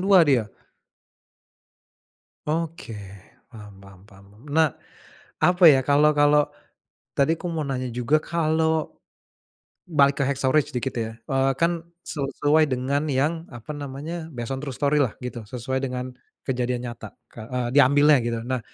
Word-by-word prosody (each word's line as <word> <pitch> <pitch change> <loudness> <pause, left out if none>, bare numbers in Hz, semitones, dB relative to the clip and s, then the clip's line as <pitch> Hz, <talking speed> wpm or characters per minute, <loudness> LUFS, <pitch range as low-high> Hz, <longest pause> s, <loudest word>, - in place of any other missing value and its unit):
2 190 -1 +6
dia? 125 -7 +2 2.0
Oke, 165 -4 -3 0.6
paham 105 -4 -13
paham 100 -1 -15
paham. 100 -1 -18 0.3
Nah, 160 -3 +2 0.7
apa 180 0 +4
ya 135 - +3
kalau 150 +2 +5
kalau, 145 0 +5 0.7
tadi 145 +4 +3
aku 180 - -6
mau 155 -2 -2
nanya 130 -2 -3
juga 125 +5 +1
kalau, 160 -1 0 0.9
balik 140 -4 +3
ke - - +3
"Hacksaw 135 -1 0
Ridge" 150 -1 +3
sedikit 130 +1 -2
ya, 110 -1 -2 0.2
eee, 135 0 +3
kan 170 0 +1 0.2
sesuai 145 +1 +1
dengan 135 +3 -1
yang 155 +5 0
apa 120 +4 -12
namanya 145 +4 -6
based 120 0 -5
on 130 - -4
true 140 -2 -5
story-lah 145 -4 +1
gitu 120 -3 -6
sesuai 130 +2 -3
dengan 125 0 -4 0.4
kejadian 125 -1 -1
nyata 120 -1 -8 0.2
ka 120 +2 -4
diambilnya 145 +1 +6
gitu 115 -1 -1
nah, 130 0 -1
140 Hz, 140 wpm, -24 LUFS, 125-155 Hz, 2.0 s, 2